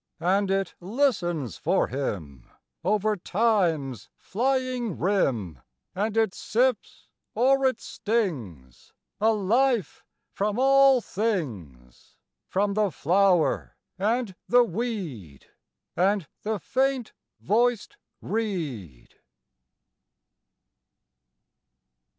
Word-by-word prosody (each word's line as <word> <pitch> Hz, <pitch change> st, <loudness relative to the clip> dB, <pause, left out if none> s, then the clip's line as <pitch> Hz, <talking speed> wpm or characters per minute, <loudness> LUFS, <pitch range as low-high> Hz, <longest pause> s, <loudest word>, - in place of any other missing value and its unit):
And 195 Hz, +3 st, +1 dB
it 195 Hz, -1 st, 0 dB
listens 175 Hz, -, -1 dB
for -, -, +1 dB
Him 85 Hz, -, -5 dB, 0.3 s
Over 210 Hz, +3 st, +1 dB
Time's 175 Hz, -, 0 dB
flying 255 Hz, -, -1 dB
rim, 125 Hz, -, 0 dB, 0.3 s
And 210 Hz, +3 st, -2 dB
it 220 Hz, -4 st, +2 dB
sips, 245 Hz, 0 st, -1 dB, 0.3 s
or 270 Hz, +3 st, +4 dB
it 255 Hz, -3 st, -1 dB
stings, 125 Hz, -, -4 dB, 0.3 s
A 220 Hz, +2 st, +4 dB
life 225 Hz, +2 st, +1 dB, 0.3 s
from 205 Hz, +2 st, -1 dB
all 270 Hz, 0 st, +5 dB
things 110 Hz, -, -4 dB, 0.3 s
From 200 Hz, +1 st, 0 dB
the 210 Hz, -1 st, +1 dB
flower 180 Hz, +2 st, +1 dB, 0.2 s
and 220 Hz, +1 st, 0 dB, 0.2 s
the 245 Hz, 0 st, +6 dB
weed 175 Hz, -, -5 dB, 0.5 s
And 195 Hz, -2 st, +1 dB
the 215 Hz, 0 st, -2 dB
faint 260 Hz, +2 st, -1 dB, 0.3 s
voiced 240 Hz, -, 0 dB, 0.3 s
reed. 150 Hz, -, -4 dB
200 Hz, 85 wpm, -26 LUFS, 155-235 Hz, 0.5 s, the